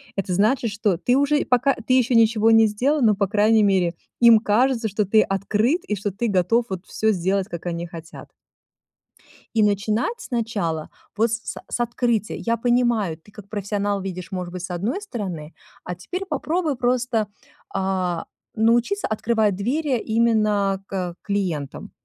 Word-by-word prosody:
Это 190 -2 -2
значит, 230 +4 +2
что 205 -3 0
ты 250 +5 +2
уже 285 +1 +2
и - - -2
пока 255 +2 +3
ты 240 +2 -2
еще 250 0 +2
ничего 225 -1 +4
не 225 -1 +6
сделал, 270 +8 0
но, 215 -4 +4
по 200 0 0
крайней 215 +2 +3
мере, 185 -4 +2 0.2
им 235 -2 +8
кажется, 230 +2 +1
что 210 +2 0
ты 215 +3 +4
открыт, 210 - 0
и 210 - -1
что 200 +1 -3
ты 235 +5 -2
готов 210 +4 +2
вот 190 -1 -5
всё 220 - -1
сделать, 190 +1 0
как 170 0 -7
они 170 0 -3
хотят. 165 -1 -11 1.3
И 220 - +4
начинать 210 - 0
сначала, 215 - -3 0.3
вот 225 +1 +2
с 230 - -1
с - - -6
с - - -3
открытия. 235 -2 0
Я 230 0 0
понимаю, 235 -7 +1
ты, 205 +5 -21
как 200 -1 -13
профессионал, 205 -1 -2
видишь, 185 -1 -6
может 180 -2 -5
быть, 180 -1 -6
с 180 - -5
одной 210 - -2
стороны, 185 - -6 0.3
а 180 - -5
теперь 365 - -5
попробуй 315 -1 -1
просто, 245 -3 0 0.5
а, 185 -3 -1 0.3
научиться 235 - +2
открывать 215 -2 +1
двери 260 +6 0
именно 215 -4 +1
к, - - -13
э, 180 -2 -2
клиентам. 180 -9 -3
215 Hz, 170 wpm, -22 LUFS, 190-240 Hz, 1.3 s, им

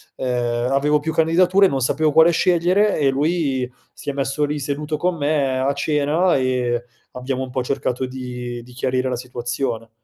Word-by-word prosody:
ehm, 120 -1 -1
avevo 145 +2 +3
più 160 +2 -3
candidature, 180 +5 +4
non 135 - -1
sapevo 150 +4 +1
quale 160 +3 +6
scegliere 180 +5 +2
e 140 -3 +2
lui 140 -4 0 0.2
si - - -7
è - - -2
messo 135 +1 -1
lì 150 +1 -3
seduto 150 +2 -3
con 180 +2 0
me 145 -3 0
a 135 +2 +1
cena 150 +5 +1
e 125 -2 0 0.3
abbiamo 130 +1 -3
un 130 - -7
po' 130 0 -1
cercato 130 0 -2
di 125 -2 -6
di 125 +1 -15
chiarire 130 +1 -1
la 125 - -1
situazione, 125 -1 -4
135 Hz, 175 wpm, -21 LUFS, 125-155 Hz, 0.3 s, quale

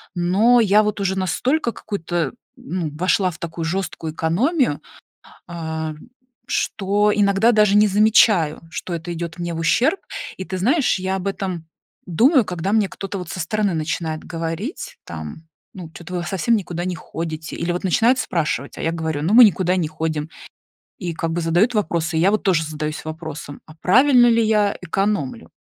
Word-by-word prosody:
Но 200 +8 +4
я, 210 0 +4
вот, 210 -1 -2
уже 190 -1 0
настолько 235 - 0
какую-то 175 -5 -3 0.2
ну, 185 - -4
вошла 185 +3 +2
в 155 - -13
такую 165 0 -5
жесткую 165 -3 -3
экономию, 200 - +1 0.7
а, 160 -2 -4 0.5
что 205 +1 +1
иногда 205 +3 +3
даже 210 -2 +4
не 210 +1 +6
замечаю, 205 -5 +4
что 180 - -6
это 170 +1 -5
идёт 170 0 -6
мне 175 -1 -3
в - - -5
ущерб. 250 - +2 0.4
И 190 - -4
ты 185 +2 -5
знаешь, 255 - +2
я 190 +1 -2
об 190 0 -5
этом 185 -4 -4 0.4
думаю, 245 - +4
когда 180 +1 -3
мне 215 -3 +3
кто-то, 195 0 -6
вот, 180 - -7
со - - -5
стороны 205 +2 0
начинает 160 0 -3
говорить, 165 - -5
там: 80 - -8 0.3
"Ну, 175 -4 -9
чё-то 175 +2 -9
вы 175 - -1
в - - -6
совсем 210 +5 +1
никуда 175 -3 -4
не 180 -2 -3
ходите?" 160 0 -6
Или, 170 +1 -1
вот, 180 +2 -4
начинают 230 +8 +3
спрашивать, 150 - -2
а - - -5
я 165 - +1
говорю, 160 -3 -3
ну, 170 +6 0
мы 245 - +10
никуда 185 -3 +2
не 170 -4 0
ходим, 155 -1 -3 0.7
и, 175 -3 -3
как 165 0 -3
бы, 175 - -1
задают 175 +9 +2
вопросы. 165 -6 0
И 160 - +2
я, 195 +3 +4
вот, 215 - 0
тоже 175 -4 +2
задаюсь 155 0 -5
вопросом, 155 -2 -7
а 155 - -15
правильно 245 - +5
ли 230 -1 +4
я 210 -2 +2
экономлю? 190 -5 -2
180 Hz, 180 wpm, -21 LUFS, 160-210 Hz, 0.7 s, мы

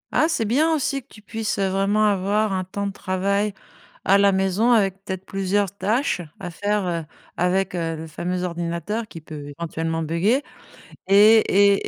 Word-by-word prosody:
Ah, 315 - +4
c'est 320 -8 0
bien 290 +9 +2
aussi 275 -2 -1
que - - -41
tu 215 - -16
puisses, 220 +2 -3
heu, 195 -1 +1
vraiment 195 +3 +1
avoir 205 +1 +1
un 185 -1 -1
temps 200 +2 -4
de 200 - -2
travail 200 +2 -1 0.5
à 195 - +5
la 200 0 +4
maison, 190 +5 +2
avec 195 -4 +3
peut-être 190 -1 -4
plusieurs 195 0 0
tâches 225 +1 0 0.2
à 175 - -4
faire, 205 +3 -1
heu, 170 -2 -2 0.3
avec 180 +2 +1
heu, 165 -2 -2
le 160 +1 -7
fameux 180 +3 -3
ordinateur 175 +6 -3
qui 165 - -10
peut 145 -2 -8
éventuellement 165 -1 -2
buguer 190 - +1 0.6
et 195 - +2 0.2
et 200 -1 +4
195 Hz, 175 wpm, -23 LUFS, 180-210 Hz, 0.6 s, à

